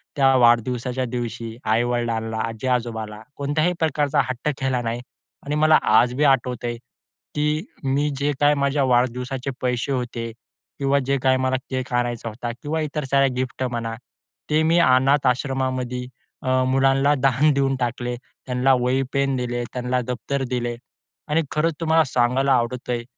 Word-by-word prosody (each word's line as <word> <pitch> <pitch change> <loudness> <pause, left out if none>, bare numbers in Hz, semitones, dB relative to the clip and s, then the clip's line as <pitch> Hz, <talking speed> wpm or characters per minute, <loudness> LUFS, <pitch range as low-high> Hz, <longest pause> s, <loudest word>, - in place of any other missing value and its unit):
त्या 135 -2 +4
वाढदिवसाच्या 125 +2 +2
दिवशी 115 -1 -5
आई-वडिलांला, 115 0 0
आजी-आजोबाला 115 -2 -3 0.2
कोणत्याही 155 +5 +1
प्रकारचा 150 -3 +1
हट्ट 130 +4 -2
केला 130 -2 0
नाही 115 +1 -3 0.4
आणि 145 +1 -2
मला 155 +1 +5
आज 120 +3 +4
बी 150 - +1
आठवतंय 120 -1 -5 0.6
की 150 +2 0 0.2
मी 140 +2 +1
जे 145 +1 +1
काही 145 0 +5
माझ्या 140 0 +1
वाढदिवसाचे 125 +1 0
पैसे 125 +1 -1
होते 120 -3 -2 0.5
किंवा 140 0 +2
जे 140 0 +2
काही 130 0 +4
मला 130 0 +1
केक 130 -1 -3
आणायचा 120 -1 -1
होता 120 +2 -5
किंवा 155 +2 -1
इतर 150 0 -3
साऱ्या 140 0 +4
गिफ्ट 130 0 -3
म्हणा, 115 -2 -3 0.6
ते 155 +1 +3
मी 165 +2 +3
अनाथ 135 -2 +4
आश्रमामध्ये 130 -1 -1 0.4
अ, 130 0 +2
मुलांला 135 +2 +3
दान 135 +3 +3
देऊन 135 -1 +1
टाकले. 120 0 -2 0.3
त्यांला 130 +1 +2
वही 130 +2 +1
पेन 140 -1 +1
दिले. 120 -1 -2
त्यांला 125 0 -1
दफ्तर 125 +3 -2
दिले. 120 -1 -2 0.5
आणि 155 +2 +2
खरंच 160 +1 +1
तुम्हाला 160 0 +4
सांगायला 130 +2 +2
आवडतंय 120 0 -1
130 Hz, 145 wpm, -23 LUFS, 120-140 Hz, 0.6 s, मला